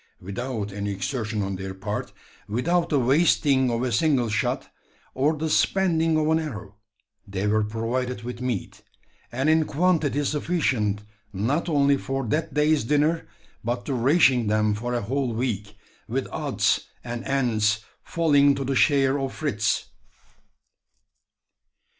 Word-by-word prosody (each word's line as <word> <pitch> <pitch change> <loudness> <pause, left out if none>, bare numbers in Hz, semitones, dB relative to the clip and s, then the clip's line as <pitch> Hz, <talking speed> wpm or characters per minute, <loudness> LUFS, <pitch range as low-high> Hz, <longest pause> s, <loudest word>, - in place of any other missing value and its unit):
Without 105 +2 -4
any 100 0 -3
exertion 105 +2 -2
on 95 -1 -3
their 95 0 -6
part 105 +2 -4 0.4
without 170 +10 +1
the 150 - +2
wasting 135 0 +3
of 120 +1 -1
a 125 - -1
single 135 -6 +2
shot, 105 - -1 0.5
or 145 +4 +1
the 160 +2 -2
spending 165 -1 +2
of 155 - +1
an 160 0 +3
arrow, 110 -10 -7 0.5
they 100 0 -3
were 110 +1 +2
provided 115 +3 -3
with 125 0 -6
meat; 125 -6 -3 0.5
and 130 +4 -1
in 160 0 +4
quantity 150 -4 +1
sufficient, 135 - 0 0.3
not 130 - -1
only 140 -2 +3
for 135 -1 -3
that 150 +8 -1
day's 150 -2 +2
dinner, 150 +2 +1 0.4
but 120 +1 -2
to 140 - -2
ration 125 -2 +3
them 105 0 +2
for 120 +4 -3
a 120 - 0
whole 130 +1 -1
week, 105 -4 -3 0.3
with - - -2
odds - - 0 0.2
and 120 0 -5
ends 110 -6 +1 0.2
falling 145 -5 +3
to 135 - -3
the 135 +1 -1
share 140 0 +3
of 135 -1 -2
Fritz. 105 -9 -1
130 Hz, 140 wpm, -25 LUFS, 110-150 Hz, 0.5 s, in